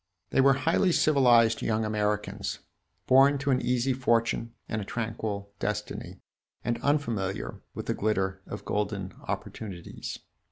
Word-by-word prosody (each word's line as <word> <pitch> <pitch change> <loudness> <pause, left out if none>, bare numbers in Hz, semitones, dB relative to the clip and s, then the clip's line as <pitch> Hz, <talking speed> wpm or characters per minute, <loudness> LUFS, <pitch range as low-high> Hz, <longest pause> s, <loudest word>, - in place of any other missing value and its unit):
They - - +4
were 135 +1 +6
highly 165 +7 +2
civilized 125 -8 +5
young 110 0 0
Americans, 105 -1 -1 0.5
born 135 +4 +6
to 140 0 0
an 130 - +2
easy 125 +2 +1
fortune 115 -2 +1
and 110 - -2
a - - -3
tranquil 110 -2 -4
destiny, 105 0 -4 0.4
and 120 0 -1
unfamiliar 115 -10 -1
with - - -5
the - - 0
glitter 95 -2 0
of 105 -1 -7
golden 100 -2 -2
opportunities. 95 -6 -5
115 Hz, 130 wpm, -28 LUFS, 105-130 Hz, 0.5 s, were